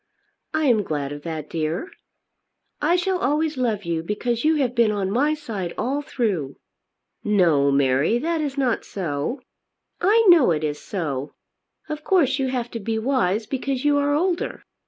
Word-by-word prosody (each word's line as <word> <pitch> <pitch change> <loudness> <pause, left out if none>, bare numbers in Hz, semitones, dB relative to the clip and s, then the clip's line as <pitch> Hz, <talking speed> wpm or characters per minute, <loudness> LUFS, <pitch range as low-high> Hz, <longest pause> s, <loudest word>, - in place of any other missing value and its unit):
"I 315 -1 0
am 235 -6 +4
glad 145 -6 -3
of 145 0 -7
that, 155 -2 -5
dear." 165 - -3 0.9
"I 325 +4 +3
shall 360 +1 0
always 300 +3 0
love 230 -6 -1
you, 165 -1 -1
because 225 +6 -2
you 315 +1 +4
have 260 -5 0
been 235 -3 +3
on 195 -2 -1
my 290 +7 +2
side 210 - -5
all 275 +4 -1
through." 195 - -2 0.7
"No, 170 -9 +3
Mary; 140 - +2
that 325 +5 -1
is 285 -2 -3
not 255 -4 +1
so." 175 - -3 0.6
"I 440 +5 +4
know 340 - +7
it 155 -2 0
is 150 -1 -2
so. 145 -8 -4 0.5
Of 305 0 -5
course 310 -8 +2
you 265 - +1
have 250 -2 -3
to 230 - -4
be 220 +2 -2
wise 220 -4 +1
because 270 +2 -3
you 290 -1 +4
are 290 0 +1
older. 355 +3 -1
235 Hz, 170 wpm, -23 LUFS, -, 0.9 s, know